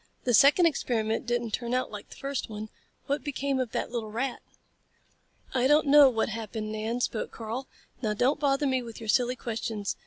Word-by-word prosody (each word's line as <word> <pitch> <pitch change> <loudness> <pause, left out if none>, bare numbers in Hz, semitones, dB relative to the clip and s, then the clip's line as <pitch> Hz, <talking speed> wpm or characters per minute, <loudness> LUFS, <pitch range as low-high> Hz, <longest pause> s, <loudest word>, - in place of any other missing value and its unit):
The 245 - +1
second 285 - +6
experiment 225 -8 0
didn't 240 -2 -1
turn 240 +2 -2
out 255 - -1
like 210 -1 -8
the - - -11
first 275 -4 -4
one. 215 0 -6 0.4
What 285 +2 -1
became 280 -2 -1
of 250 -3 -2
that - - -2
little 230 -3 -3
rat?" 240 +4 -3 1.1
"I 255 -1 +3
don't 300 +2 +4
know 285 -1 +8
what 225 -3 0
happened, 220 -1 -5
Nan," 220 +3 -2
spoke 225 - -1
Karl. 230 +4 -5 0.3
"Now 215 -3 0
don't 260 +7 +2
bother 280 0 +2
me 260 -2 +1
with 230 -2 -9
your 225 -2 -7
silly 250 +2 +3
questions. 225 -4 -3
240 Hz, 190 wpm, -28 LUFS, 220-270 Hz, 1.1 s, know